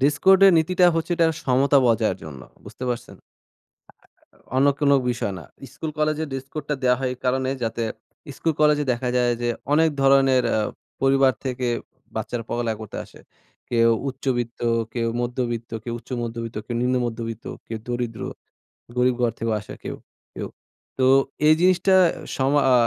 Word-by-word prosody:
Dress 145 Hz, +2 st, +3 dB
code 190 Hz, 0 st, +7 dB
এর 190 Hz, -, +7 dB
নীতিটা 180 Hz, +3 st, +3 dB
হচ্ছে 165 Hz, +2 st, -2 dB
এটা 165 Hz, -1 st, +4 dB, 0.2 s
সমতা 135 Hz, +2 st, +4 dB
বজায় 115 Hz, -2 st, +2 dB
জন্য 70 Hz, -4 st, -9 dB, 0.2 s
বুঝতে 130 Hz, -, -8 dB
পারছেন? 120 Hz, -1 st, -4 dB
আ -, -, -75 dB, 1.1 s
আ -, -, -24 dB, 0.2 s
অন্য 135 Hz, +2 st, +4 dB
কোনো 145 Hz, -2 st, +4 dB, 0.2 s
বিষয় 115 Hz, -4 st, -2 dB
না। -, -, -11 dB, 0.3 s
স্কুল 155 Hz, +1 st, -5 dB
কলেজের 155 Hz, 0 st, 0 dB
ড্রেস 135 Hz, 0 st, -4 dB
কোডটা 150 Hz, -1 st, -3 dB
দেওয়া 125 Hz, -1 st, +4 dB
হয় 130 Hz, -1 st, -1 dB
এই 125 Hz, -, -13 dB
কারণে 130 Hz, +1 st, +1 dB
যাতে 115 Hz, +1 st, -2 dB, 0.5 s
স্কুল 165 Hz, -2 st, 0 dB
কলেজে 150 Hz, -1 st, +4 dB
দেখা 125 Hz, +1 st, -2 dB
যায় 120 Hz, -1 st, +3 dB
যে, 120 Hz, -, 0 dB, 0.3 s
অনেক 160 Hz, +1 st, +4 dB
ধরনের 135 Hz, -2 st, +5 dB
আ 110 Hz, -, +2 dB, 0.4 s
পরিবার 135 Hz, -1 st, +4 dB
থেকে 125 Hz, -1 st, -2 dB, 0.5 s
বাচ্চারা 120 Hz, -1 st, -3 dB
পড়ালেখা 115 Hz, -2 st, -2 dB
করতে 110 Hz, -, -7 dB
আসে। -, -, -17 dB, 0.5 s
কেউ 115 Hz, -1 st, +4 dB, 0.2 s
উচ্চবিত্ত, 120 Hz, -3 st, -3 dB, 0.3 s
কেউ 115 Hz, -1 st, -1 dB
মধ্যবিত্ত, 120 Hz, -1 st, -3 dB
কেউ 120 Hz, -1 st, -4 dB
উচ্চমধ্যবিত্ত, 115 Hz, -1 st, -5 dB
কেউ 120 Hz, -, -4 dB
নিম্ন 125 Hz, +1 st, +1 dB
মধ্যবিত্ত, 115 Hz, -1 st, -5 dB, 0.2 s
কেউ 115 Hz, -, -4 dB
দরিদ্র 120 Hz, -2 st, -3 dB, 0.8 s
গরীব 125 Hz, 0 st, +3 dB
ঘর 120 Hz, -1 st, +2 dB
থেকেও 115 Hz, 0 st, 0 dB
আসে 105 Hz, -, -10 dB
কেউ, -, -, -4 dB, 0.4 s
কেউ। -, -, -5 dB, 0.5 s
তো 130 Hz, -, +2 dB, 0.4 s
এই 155 Hz, -, +8 dB
জিনিসটা 185 Hz, +1 st, +4 dB, 0.4 s
সমা 140 Hz, +2 st, +2 dB
আ -, -, +6 dB
125 Hz, 165 wpm, -23 LUFS, 120-145 Hz, 1.1 s, এই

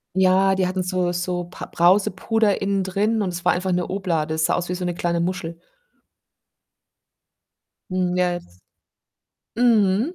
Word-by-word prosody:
Ja, 190 Hz, +1 st, +4 dB
die 185 Hz, -1 st, +1 dB
hatten 185 Hz, 0 st, -2 dB
so 180 Hz, -1 st, -1 dB
so 175 Hz, 0 st, -2 dB
Pa 180 Hz, -, -9 dB
Brausepuder 195 Hz, +4 st, +2 dB
innen 195 Hz, 0 st, 0 dB
drin 210 Hz, +4 st, 0 dB
und 190 Hz, -, -1 dB
es 175 Hz, 0 st, -6 dB
war -, -, +5 dB
einfach 185 Hz, +1 st, -2 dB
eine 180 Hz, 0 st, -1 dB
Oblade. 170 Hz, -5 st, -1 dB
Es 160 Hz, 0 st, +1 dB
sah 175 Hz, -, +1 dB
aus 175 Hz, 0 st, -3 dB
wie -, -, -1 dB
so 180 Hz, 0 st, -4 dB
'ne 175 Hz, -1 st, -2 dB
kleine 170 Hz, -1 st, -1 dB
Muschel. 170 Hz, -1 st, -3 dB, 2.3 s
Mm, 180 Hz, -1 st, 0 dB
jetzt 175 Hz, -, -2 dB, 1.0 s
mhm. 230 Hz, -, +3 dB
185 Hz, 155 wpm, -22 LUFS, 175-195 Hz, 2.3 s, war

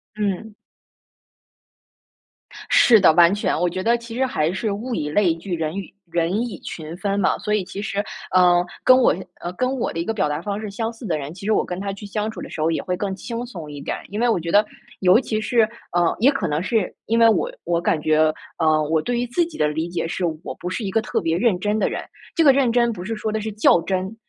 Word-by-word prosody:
嗯。 210 Hz, +1 st, -2 dB, 2.2 s
是 270 Hz, -, +6 dB
的， 185 Hz, -, +6 dB
完 170 Hz, +3 st, +6 dB
全， 205 Hz, -, 0 dB
我 175 Hz, 0 st, +2 dB
觉 185 Hz, +2 st, -4 dB
得 235 Hz, +1 st, +3 dB
其 235 Hz, -1 st, -9 dB
实 265 Hz, +2 st, +1 dB
还 160 Hz, -11 st, 0 dB
是 205 Hz, +3 st, -2 dB
物 235 Hz, +5 st, -4 dB
以 150 Hz, -, -2 dB
类 175 Hz, 0 st, +3 dB
聚， 175 Hz, +1 st, -4 dB
人 160 Hz, 0 st, -3 dB
与 200 Hz, -, -7 dB, 0.2 s
人 170 Hz, +1 st, 0 dB
以 240 Hz, -3 st, -4 dB
群 160 Hz, 0 st, -7 dB
分 200 Hz, 0 st, -1 dB
嘛。 -, -, +2 dB
所 210 Hz, -, -2 dB
以 210 Hz, -2 st, +1 dB
其 195 Hz, +2 st, -7 dB
实， 205 Hz, -1 st, -2 dB, 0.3 s
嗯， 175 Hz, -1 st, +5 dB, 0.2 s
跟 255 Hz, 0 st, +7 dB
我 255 Hz, -, +4 dB
相 185 Hz, -, -6 dB, 0.3 s
跟 255 Hz, 0 st, +1 dB
我 -, -, -1 dB
的 165 Hz, -, -5 dB
一 170 Hz, -, -2 dB
个 225 Hz, -, -1 dB
表 190 Hz, -9 st, 0 dB
达 150 Hz, +2 st, -2 dB
方 205 Hz, +2 st, -3 dB
式 215 Hz, -2 st, -5 dB
相 225 Hz, +3 st, -3 dB
似 225 Hz, +1 st, -11 dB
的 160 Hz, -5 st, 0 dB
人， 145 Hz, +2 st, -6 dB
其 195 Hz, +2 st, -10 dB
实 220 Hz, -, +1 dB
我 -, -, +2 dB
跟 180 Hz, +1 st, -5 dB
他 200 Hz, 0 st, -3 dB
去 200 Hz, +1 st, -9 dB
相 210 Hz, +2 st, -2 dB
处 220 Hz, -, -8 dB
的 -, -, -7 dB
时 155 Hz, -, -5 dB
候 165 Hz, +1 st, +2 dB
也 160 Hz, -, -1 dB
会 180 Hz, -, -2 dB
更 195 Hz, 0 st, -3 dB
轻 235 Hz, +5 st, -5 dB
松 170 Hz, -11 st, -8 dB
一 145 Hz, -1 st, -8 dB
点。 -, -, -3 dB
因 205 Hz, +2 st, -4 dB
为 245 Hz, -, +2 dB
我 225 Hz, -6 st, +2 dB
觉 170 Hz, 0 st, -4 dB
得， 205 Hz, +3 st, +5 dB, 0.3 s
尤 185 Hz, +4 st, +5 dB
其 220 Hz, -5 st, -2 dB
是， 235 Hz, +1 st, +2 dB, 0.3 s
呃， 175 Hz, -1 st, +2 dB
也 265 Hz, +6 st, +5 dB
可 210 Hz, -11 st, -2 dB
能 150 Hz, +2 st, -1 dB
是 215 Hz, -1 st, 0 dB
因 230 Hz, +1 st, +1 dB
为 230 Hz, -, +7 dB
我 345 Hz, -, +2 dB
我 170 Hz, 0 st, 0 dB
感 155 Hz, -, +1 dB
觉， 155 Hz, 0 st, +2 dB, 0.4 s
呃， 155 Hz, -1 st, +3 dB
我 160 Hz, -1 st, +2 dB
对 240 Hz, +6 st, -1 dB
于 245 Hz, -, -1 dB
自 330 Hz, +8 st, +1 dB
己 325 Hz, -2 st, -10 dB
的 150 Hz, -, +2 dB
理 160 Hz, +3 st, -2 dB
解 170 Hz, -1 st, -2 dB
是， 180 Hz, -, -3 dB, 0.2 s
我 -, -, -5 dB
不 180 Hz, -, -4 dB
是 215 Hz, +4 st, -3 dB
一 190 Hz, -, -3 dB
个 225 Hz, -, +2 dB
特 215 Hz, -, -1 dB
别 165 Hz, 0 st, 0 dB
认 205 Hz, -4 st, +2 dB
真 210 Hz, +2 st, 0 dB
的 -, -, +1 dB
人。 -, -, -4 dB, 0.3 s
这 330 Hz, -, +4 dB
个 280 Hz, -, +8 dB
认 260 Hz, -3 st, +2 dB
真 235 Hz, -1 st, +3 dB
不 175 Hz, -, -7 dB
是 225 Hz, +4 st, -3 dB
说 215 Hz, 0 st, -3 dB
的 220 Hz, -, -1 dB
是 220 Hz, -, -4 dB
较 200 Hz, -5 st, +4 dB
真， 190 Hz, +3 st, -2 dB
200 Hz, 280 characters per minute, -22 LUFS, 170-225 Hz, 2.2 s, 个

